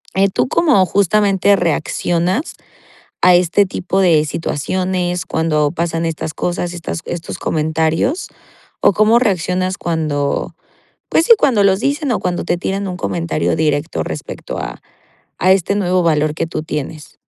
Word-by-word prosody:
Eh, 195 Hz, 0 st, +3 dB
tú 190 Hz, -, 0 dB
como 280 Hz, -, +3 dB
justamente 200 Hz, +1 st, +2 dB
reaccionas 175 Hz, -, -1 dB, 0.7 s
a 180 Hz, -, +6 dB
este 180 Hz, +3 st, +3 dB
tipo 185 Hz, +1 st, -2 dB
de 165 Hz, -5 st, +4 dB
situaciones, 180 Hz, +3 st, -2 dB
cuando 155 Hz, -2 st, +1 dB
pasan 170 Hz, -1 st, -2 dB
estas 160 Hz, -1 st, -4 dB
cosas, 175 Hz, 0 st, -2 dB
estas 85 Hz, -, -5 dB
estos 170 Hz, -1 st, -5 dB
comentarios 160 Hz, -, 0 dB, 0.5 s
o -, -, +4 dB
cómo 215 Hz, +4 st, +4 dB
reaccionas 185 Hz, -3 st, 0 dB
cuando, 155 Hz, -2 st, -2 dB, 0.6 s
pues, 325 Hz, -, +3 dB
sí, 470 Hz, -, +3 dB
cuando 225 Hz, -, +3 dB
los 195 Hz, 0 st, +3 dB
dicen 285 Hz, -1 st, -1 dB
o -, -, 0 dB
cuando 180 Hz, -1 st, -2 dB
te 175 Hz, -, 0 dB
tiran 195 Hz, +2 st, -3 dB
un 180 Hz, -1 st, -5 dB
comentario 165 Hz, -4 st, -1 dB
directo 155 Hz, 0 st, -1 dB
respecto 80 Hz, -1 st, -6 dB
a -, -, -6 dB, 0.6 s
a 185 Hz, +2 st, +3 dB
este 195 Hz, +1 st, +2 dB
nuevo 185 Hz, -2 st, +1 dB
valor 155 Hz, -2 st, +1 dB
que 160 Hz, -, -3 dB
tú 155 Hz, -, -4 dB
tienes. 150 Hz, 0 st, -6 dB
175 Hz, 145 wpm, -17 LUFS, 160-195 Hz, 0.7 s, a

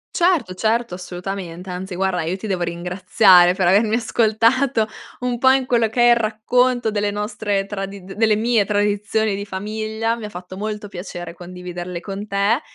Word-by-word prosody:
Certo, 340 Hz, -, +2 dB
certo, 225 Hz, +2 st, 0 dB
assolutamente, 180 Hz, 0 st, -6 dB
anzi, 185 Hz, +1 st, -5 dB
guarda 190 Hz, -2 st, 0 dB
io 170 Hz, +4 st, -2 dB
ti 220 Hz, -, -8 dB
devo 190 Hz, -4 st, -2 dB
ringraziare 180 Hz, +1 st, +4 dB
per 185 Hz, -, +1 dB
avermi 210 Hz, +5 st, +4 dB
ascoltato 230 Hz, +1 st, +2 dB, 0.3 s
un 245 Hz, -1 st, -2 dB
po' 260 Hz, +1 st, +5 dB
in 265 Hz, 0 st, +3 dB
quello 235 Hz, -3 st, +2 dB
che 240 Hz, +3 st, 0 dB
è 240 Hz, -, +6 dB
il -, -, +7 dB
racconto 235 Hz, +2 st, +1 dB
delle 205 Hz, -1 st, 0 dB
nostre 205 Hz, -1 st, -2 dB
tradi 195 Hz, -1 st, -6 dB
delle 210 Hz, +3 st, +1 dB
mie 225 Hz, 0 st, +2 dB
tradizioni 205 Hz, +1 st, 0 dB
di 200 Hz, -, -4 dB
famiglia. 215 Hz, +3 st, -3 dB
Mi 230 Hz, -2 st, -7 dB
ha -, -, -6 dB
fatto 180 Hz, -1 st, -9 dB
molto 210 Hz, +1 st, -4 dB
piacere 175 Hz, -2 st, -7 dB
condividerle 180 Hz, 0 st, -7 dB
con 200 Hz, +3 st, -6 dB
te 205 Hz, +7 st, +1 dB
205 Hz, 170 wpm, -21 LUFS, 185-225 Hz, 0.3 s, il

